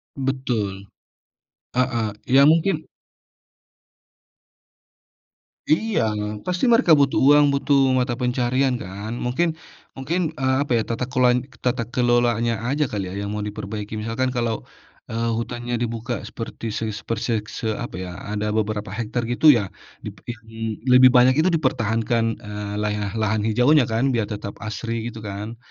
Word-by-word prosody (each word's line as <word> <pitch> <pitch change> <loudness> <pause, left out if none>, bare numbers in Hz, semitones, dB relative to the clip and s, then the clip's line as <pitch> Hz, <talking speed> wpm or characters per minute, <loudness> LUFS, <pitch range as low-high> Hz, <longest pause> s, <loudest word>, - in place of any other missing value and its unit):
Betul, 120 -8 -2 0.9
heeh, 120 -4 +1 0.2
ya 135 +2 +6
mungkin 160 +2 +3 2.8
Iya, 215 - +2 0.4
pasti 180 +5 0
mereka 230 -7 +4
butuh 140 -1 +3
uang 145 +1 +7
butuh 140 0 +2 0.2
mata 125 -1 +1
pencaharian 125 +2 +1
kan 100 +4 -7
mungkin 160 +6 0 0.4
mungkin, 145 +7 -1 0.2
eee, 130 -1 +1
apa 145 - -3
ya 115 - +2
tata 115 +2 -1
keloan 125 -2 +4 0.3
tata 125 -1 +1
kelolanya 120 -1 +2 0.2
aja 145 +3 +1
kali 100 -3 -3
ya - - -7
yang - - -4
mau 105 - -3
diperbaiki 105 0 -6
misalkan, 115 +4 -1
kalau, 120 -3 -1 0.5
eee, 115 +1 -1
hutannya 120 +1 -4
dibuka 115 0 -3
seperti 115 0 -6
se 110 - -3
seperse 115 +2 -3 0.2
se - - -6
apa 120 0 -6
ya 90 - -7 0.2
ada 105 0 -2
beberapa 105 -2 -2
hektar 115 +2 -2
gitu 120 +6 -2
ya 105 - -1 0.4
dipe - - -8
di - - -1
mmm, 110 0 -6
lebih 130 0 +8
banyak 125 +1 +6
itu 180 - +3
dipertahankan, 115 -4 0 0.2
eee, 105 -1 -5
lah 105 0 0 0.2
lahan 110 -1 +1
hijaunya 125 +5 +4
kan 115 +2 0
biar 115 -3 0
tetap 105 -2 -5
asri 115 +2 -4
gitu 115 - -10
kan, 105 +3 -6
120 Hz, 140 wpm, -22 LUFS, 110-130 Hz, 2.8 s, lebih